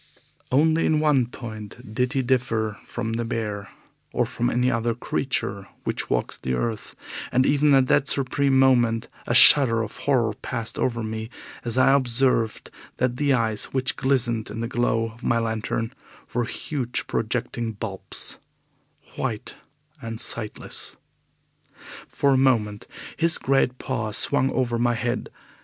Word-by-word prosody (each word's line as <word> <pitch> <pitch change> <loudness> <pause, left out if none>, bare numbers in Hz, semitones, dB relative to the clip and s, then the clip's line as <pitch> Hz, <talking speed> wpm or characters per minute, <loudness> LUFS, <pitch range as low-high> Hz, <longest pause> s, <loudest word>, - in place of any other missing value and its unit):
Only 160 +5 +3
in 155 - +2
one 145 -6 +2
point 110 -1 -9
did 125 +3 0
he 135 -2 0
differ 115 -5 0
from 110 +1 -4
the 115 +1 -1
bear, 105 -3 -4 0.4
or - - +1
from 120 - -2
any 125 +1 +1
other 115 -1 -1
creature 100 -6 -3 0.2
which - - -3
walks - - -1
the 65 - -2
earth, 110 - -4 0.4
and 130 +1 +3
even 145 0 +4
at 135 -1 +4
that 135 - +3
supreme 140 0 +1
moment 120 -4 +3 0.2
a - - +1
shudder 115 -6 +9
of 110 - -8
horror 120 -6 +1
passed 115 +1 -5
over 120 -2 -1
me 110 0 -5 0.3
as 120 0 -2
I 135 +1 +5
observed 125 -3 +1 0.3
that 125 -1 0
the 145 -1 +2
eyes 110 -4 0
which 130 -1 -1
glistened 120 -4 0
in 115 - -5
the 115 - -2
glow 115 -2 0
of 115 +2 -18
my 115 - +2
lantern 115 +1 -2 0.4
were 120 -1 0
huge, 125 0 -3
projecting 115 0 -2
bulbs, 100 -2 -3 0.8
white 115 -5 -4 0.5
and 115 -2 -6
sightless. 110 -3 -4 1.1
For 140 -1 +1
a - - +3
moment 110 -6 +1 0.3
his 165 0 +3
great 135 -2 +1
paws 115 -6 -2
swung 135 -2 +4
over 120 -2 -1
my 120 0 +2
head. 120 +1 -2
120 Hz, 145 wpm, -24 LUFS, 115-130 Hz, 1.1 s, shudder